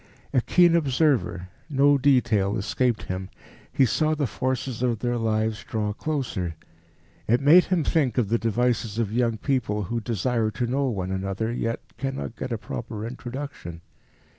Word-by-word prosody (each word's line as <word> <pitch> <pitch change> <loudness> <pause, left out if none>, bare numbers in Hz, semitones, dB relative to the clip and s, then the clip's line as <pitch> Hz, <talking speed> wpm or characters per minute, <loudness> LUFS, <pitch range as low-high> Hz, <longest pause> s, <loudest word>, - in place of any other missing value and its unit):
A 130 - +4
keen 175 +5 +4
observer, 135 - +1 0.2
no 145 0 +4
detail 120 -7 +3
escaped 120 +3 0
him; 95 +1 -5 0.4
he 135 - +4
saw 155 +5 +1
the 145 -2 0
forces 130 -1 -2
of 120 -3 +1
their 120 +2 -1
lives 110 0 0
draw 105 -2 -2
closer. 115 - -3 0.7
It 120 +3 +3
made 155 +6 +7
him 180 -4 +1
think 140 -5 +1
of 115 -6 +1
the 115 +1 +2
devices 115 -1 0
of 110 -3 -1
young 115 -1 +1
people 115 -6 -1
who 115 +4 -3
desire 115 +1 0
to 110 +4 -2
know 135 +3 0
one 95 -5 -3
another, 95 +4 -2
yet 115 -1 -2 0.2
cannot 135 -3 -4
get 125 - -5
a 115 - 0
proper 110 0 -6
introduction. 120 - -7
120 Hz, 160 wpm, -25 LUFS, 110-135 Hz, 0.7 s, made